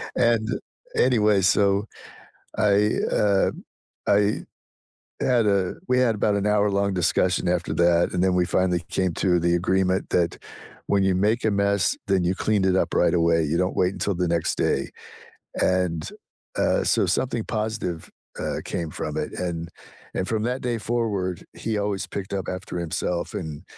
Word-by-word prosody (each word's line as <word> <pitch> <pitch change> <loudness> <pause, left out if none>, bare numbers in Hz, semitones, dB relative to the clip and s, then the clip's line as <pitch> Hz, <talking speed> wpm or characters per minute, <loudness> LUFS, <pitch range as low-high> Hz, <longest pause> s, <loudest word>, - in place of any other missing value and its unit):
and 115 -2 +2 0.5
anyway, 105 -5 +3
so, 100 +2 +3 0.7
I 105 0 +3 0.3
um, 100 -2 +1 0.4
I 100 +1 +2 0.8
had 120 -4 +3
a 95 -3 +1
we 125 - +2
had 115 -4 +3
about 105 0 +1
an 100 0 -1
hour-long 100 -1 +2
discussion 90 0 +1
after 90 -1 0
that, 85 0 +3
and 90 0 +1
then 95 -1 +3
we 90 -1 +3
finally 90 -1 +1
came 95 -3 0
to 90 -2 +2
the 85 +1 +2
agreement 95 +1 +1
that 85 -2 +1 0.5
when 100 -1 +2
you 95 -1 +2
make 110 +5 +1
a 110 - +3
mess, 100 -2 +1
then 95 -2 +2
you 90 +2 +1
cleaned 105 -3 +1
it 95 0 +3
up - - 0
right 85 -1 +3
away, 85 -1 +3
you 80 +3 0
don't 90 +1 0
wait 90 +1 +2
until 100 -3 -2
the 90 0 0
next 85 -1 0
day, - - 0 0.7
and, 90 -3 0 0.5
uh, - - +2
so, - - +2
something 120 -3 0
positive, 105 -7 -3 0.3
uh, - - -2
came 85 -2 -3
from - - -4
it, - - -3
and 85 -2 -3 0.4
and 95 - -2
from 110 -1 -1
that 125 +2 -2
day 120 -2 -1
forward, 105 -6 -2
he 110 -2 -2
always 100 -1 -2
picked 100 -1 -6
up 95 -2 -3
after 90 -1 -5
himself 85 +1 -2
and 75 -4 -6
95 Hz, 165 wpm, -24 LUFS, 90-105 Hz, 0.8 s, anyway